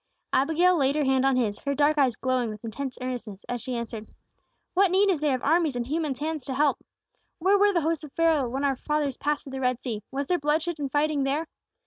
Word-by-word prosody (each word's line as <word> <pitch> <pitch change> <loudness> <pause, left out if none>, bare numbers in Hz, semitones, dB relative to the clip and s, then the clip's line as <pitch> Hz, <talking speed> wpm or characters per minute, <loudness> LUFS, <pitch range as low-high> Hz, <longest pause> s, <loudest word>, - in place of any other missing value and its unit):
Abigail 325 +6 +3
laid 275 -1 +2
her 305 - +1
hand 265 0 +3
on 270 - +3
his, 220 -5 0
her 280 0 -2
dark 295 +2 +3
eyes 260 -5 +3
glowing 255 -2 0
with 215 +1 -8
intense 260 +4 -5
earnestness, 240 -6 -6
as 245 -1 -3
she 255 +2 -4
answered: 225 -2 -5 0.6
"What 390 +1 +4
need 390 +2 +4
is 340 - 0
there 295 -3 +1
of 255 - -6
armies 315 -2 +2
and 240 -1 -2
human 300 0 -1
hands 310 +1 -3
to 265 - -4
help? 285 -1 +1 0.5
"Where 385 +4 +3
were 410 0 +5
the 345 -4 +1
hosts 320 0 -1
of 300 - -9
Pharaoh 320 -6 +2
when 270 +3 -3
our 275 -2 +1
fathers 295 -2 -1
passed 295 0 -1
through 275 - -10
the 265 0 -5
Red 250 -1 +1
Sea? 230 -5 -4
Was 280 +1 -3
there 355 +4 0
bloodshed 310 +3 0
and 280 -2 -3
fighting 295 0 +1
there? 285 +4 0
280 Hz, 240 wpm, -26 LUFS, 255-310 Hz, 0.6 s, were